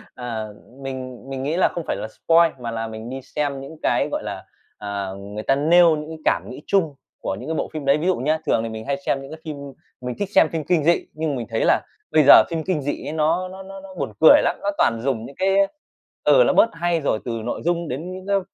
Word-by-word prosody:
À, 115 -3 -4 0.4
mình 130 -2 -6
mình 135 -1 -4
nghĩ 155 +5 -1
là - - +4
không 170 - -5
phải - - 0
là - - -5
spoil 165 +7 +3
mà 120 -2 -4
là 115 0 -3
mình 110 +1 -7
đi 135 +1 -5
xem 140 0 -3
những 140 +4 -10
cái, - - +2
gọi - - -2
là, - - -6 0.3
à, 100 -2 -4 0.2
người 105 +1 -5
ta 135 - +2
nêu 165 +3 +5
những 150 0 -6
cái 160 - -7
cảm - - +1
nghĩ 135 +4 -9
chung 165 -7 +1 0.3
của 95 - -2
những - - -7
cái 160 - -1
bộ - - -2
phim 155 -3 -5
đấy. 140 +1 +4
Ví 160 +4 -2
dụ 185 - +3
nhá, 155 +5 0
thường 115 - +2
thì 115 - -3
mình 110 0 -7
hay 140 0 -1
xem 135 - 0
những 135 - -10
cái 160 - -8
phim 155 -2 -5 0.4
mình 125 -1 -4
thích 205 - -2
xem 155 - +6
phim 160 -2 -3
kinh 175 -4 +2
dị, 170 +3 +3
nhưng 155 -2 -2
mình 120 -3 -4
thấy 115 -1 0
là - - +4 0.3
bây 155 - +5
giờ - - +9
phim 165 -2 -2
kinh 170 -3 -1
dị 145 +1 -4
ấy - - -4
nó 160 +4 +1
nó 190 +1 -9
nó 195 0 -9
nó 190 -1 -12
buồn 115 - -3
cười 160 - +8
lắm. - - +1
Nó 200 - -1
toàn 115 -1 +2
dùng 120 -3 -1
những 140 - -11
cái, 195 +1 +1
a 195 - +3 0.6
ừ, - - +6
nó - - +3
bớt 230 - +5
hay 170 0 0
rồi, 110 -6 0
từ 120 - -2
nội 120 - -3
dung 170 -1 0
đến 155 +7 -5
những 185 0 -8
cái 200 0 +3
150 Hz, 270 wpm, -22 LUFS, 125-170 Hz, 0.6 s, giờ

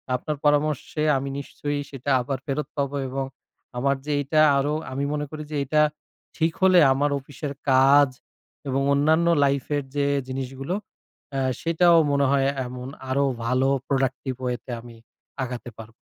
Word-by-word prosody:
আপনার 150 +4 -3
পরামর্শে 150 +1 +1
আমি 135 +1 -3
নিশ্চয়ই 145 +1 -4
সেটা 135 0 -5
আবার 135 +1 -3
ফেরত 140 0 -2
পাবো 140 0 -1
এবং 135 +1 -2 0.5
আমার 140 +2 +2
যে 150 - -2
এইটা 155 +3 +2 0.2
আরো, 145 +2 +1 0.2
আমি 135 +2 -2
মনে 150 0 -2
করি 155 -1 -6
যে - - -3
এইটা 150 +3 +2 0.6
ঠিক 160 +1 +2
হলে 185 -1 +7
আমার 145 +2 +1
অফিসের 140 +1 -7 0.2
কাজ 135 +2 +6 0.6
এবং 135 0 0
অন্যান্য 155 +4 +3 0.2
লাইফ 140 -1 +1
এর 145 - -2
যে 145 - +1 0.2
জিনিসগুলো, 135 +5 -4 0.6
অ্যা 135 -1 -1 0.2
সেটাও 170 +1 +4
মনে 140 0 +2
হয় 135 -1 +3 0.2
এমন 125 +1 -7 0.2
আরো 140 +2 +2 0.2
ভালো 130 +2 +2 0.2
productive 130 -1 -1
way 125 - 0
তে 125 - -7
আমি 120 -1 -12 0.5
আগাতে 125 -1 -6
পারবো। 115 0 -10
140 Hz, 155 wpm, -24 LUFS, 130-150 Hz, 0.6 s, হলে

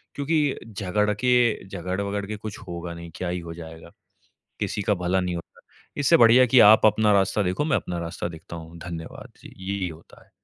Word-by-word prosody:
क्योंकि 145 -1 0
झगड़ 105 0 -1
के 120 -3 +2
झगड़-वगड़ 100 +2 -3
के 105 - -4
कुछ 105 0 -7
होगा 85 0 -6
नहीं। 85 0 -10
क्या 90 -1 -3
ही 90 0 -2
हो 85 -1 -8
जाएगा? 80 -1 -11 0.7
किसी 105 - -2
का 105 - +1
भला 90 +1 0
नहीं 90 -1 -2
होता। 85 - -3 0.6
इससे 145 +4 +5
बढ़िया 120 +1 +7
है - - +5
कि 125 +1 +6
आप 110 +1 +7
अपना 105 0 +3
रास्ता 100 +1 +2
देखो, 95 +10 -1
मैं 150 -3 +2
अपना 90 -1 -4
रास्ता 85 +1 -4
देखता 85 0 -10
हूँ। 80 +1 -10
धन्यवाद। 85 -1 -8
जी, - - -13 0.2
यही 95 -3 -2
होता 80 0 -14
है। - - -32
95 Hz, 200 wpm, -24 LUFS, 85-110 Hz, 0.7 s, बढ़िया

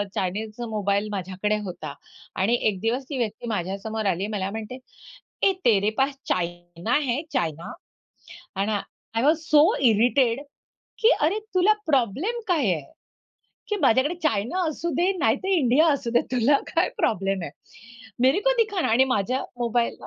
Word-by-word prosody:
चायनाचा 215 +5 -3
mobile 205 -1 0
माझ्याकडे 190 +2 -2
होता. 155 -6 -6 0.4
आणि 215 +6 +2
एक 190 -3 -4
दिवस 240 +4 0
ती 275 - -3
व्यक्ती 230 0 -3
माझ्यासमोर 205 +2 -3
आली 190 +4 -2
मला 195 -1 -2
म्हणते, 225 +3 -6 0.7
"ए, 390 - +5
तेरे 210 -3 +4
पास 270 +1 +1
चायना 175 +4 -2
है 250 +2 0
चायना?" 165 - -2 0.9
आणि 210 +2 0
आय 220 +2 -4
वॉज 310 +2 +4
सो 300 0 +6 0.2
इरिटेड 240 +3 +3 0.6
की 455 +2 +5
"अरे, 335 +8 +2 0.2
तुला 370 +4 +5
प्रॉब्लेम 290 - 0
काय 290 - +2
आहे? 145 -3 -9 0.8
की 420 - 0
माझ्याकडे 265 +5 +3
चायना 290 - 0
असू 340 +3 -3
दे 360 +5 +2
नाहीतर 275 +8 +1
इंडिया 310 -3 +4
असू 270 -4 -2
दे. 240 - +4
तुला 255 +3 +4 0.2
काय 335 +2 +3
प्रॉब्लेम 195 -3 0
आहे?" - - -5 0.7
"मेरे 265 +10 +4
को - - +5
दिखाना." 405 -4 -1
आणि 240 +4 +4
माझ्या 245 +7 -1 0.2
मोबाईलला 235 0 -1
235 Hz, 145 wpm, -24 LUFS, 200-285 Hz, 0.9 s, सो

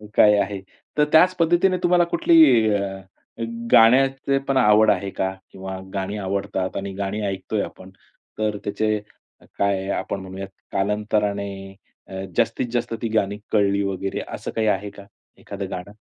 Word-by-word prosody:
काय 105 -1 +6
आहे, 100 -1 -2 0.4
तर 150 - +4
त्याच 180 +4 +6
पद्धतीने 175 +3 +3
तुम्हाला 175 0 +4
कुठली 165 -1 +4 0.4
अ, 95 -1 -3 0.7
गाण्याचे 135 +3 +5
पण 135 - +2
आवड 110 -3 +5
आहे 100 0 -1
का? 95 0 -2 0.2
किंवा 95 0 -7
गाणी 100 +1 -3
आवडतात 95 -1 -3
आणि 100 0 -4
गाणी 100 +2 -3
ऐकतोय 95 +2 -2
आपण, 95 - -10 0.5
तर 105 -1 0
त्याचे 110 +1 0 0.6
काय 100 -1 0
आपण 100 - -4
म्हणूयात 95 +1 -7 0.3
कालांतराने 105 0 0 0.6
अ, 95 0 -6
जास्तीत-जास्त 120 -1 0
ती - - +1
गाणी 100 0 -1
कळली 100 -1 +2
वगैरे, 95 0 -3
असं - - -6
काही 110 -1 -1
आहे 100 0 0
का 100 0 -13 0.3
एखादं 100 -1 -7
गाणं? 95 +3 -7
100 Hz, 140 wpm, -22 LUFS, 95-110 Hz, 0.7 s, काय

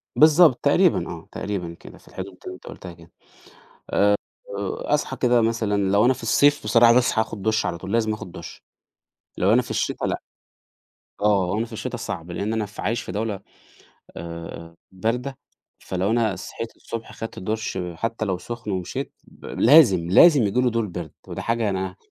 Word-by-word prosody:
بالضبط، 155 -2 +6
تقريبًا - - +3
آه، - - -8
تقريبًا 90 -5 -4
كده - - -13
في - - -23
الحدود 95 0 -8
اللي 95 - -5
أنت - - -16
قُلتها 90 -2 -9
كده، 85 0 -18 1.5
آآ - - -3
وأصحى 135 +7 -1
كده 120 -2 +3
مثلًا 110 -2 0 0.2
لو 100 +1 +4
أنا 130 +2 +4
في - - -12
الصيف 145 +5 +3
بصراحة 115 0 +6
باصحى 125 -2 +3
آخُد 110 -3 -7
دُش 110 -1 +1
على 85 -2 -3
طول 95 - -7
لازم 110 -2 +2
آخُد 95 -4 -9
دُش، - - -10 0.8
لو 95 +4 +3
أنا 125 - +5
في 120 - -9
الشتا - - -1
لأ، - - -2 1.0
آه 100 -3 +3
لو 105 - -1
أنا 115 - 0
في 115 - -13
الشتا 110 - -4
صعب 85 +2 -6
لإن 100 +5 -2
أنا 110 -1 -1
ف 105 - -14
عايش 115 +4 -1
في - - -7
دولة 105 -1 -2 0.8
آآ 85 0 -8 0.2
باردة، 120 +8 -2 0.4
فلو 95 +2 -2
أنا 110 -4 +1
صحيت 115 +5 -7
الصبح 115 -1 -7
خَدت 115 - -7
دُش 110 0 -3 0.2
حتّى 115 +4 -2
لو 95 -3 -1
سُخن 115 +2 -6
ومشيت، 95 -2 -4
ب - - -20
لازم، 110 - +5
لازم 150 - +7
ييجي 105 +4 +1
لي 125 -1 +2
دور 115 -1 0
برد، 85 -4 -7 0.2
ودي - - -5
حاجة 115 -2 0
أنا 95 -1 -3
110 Hz, 180 wpm, -23 LUFS, 95-115 Hz, 1.5 s, لازم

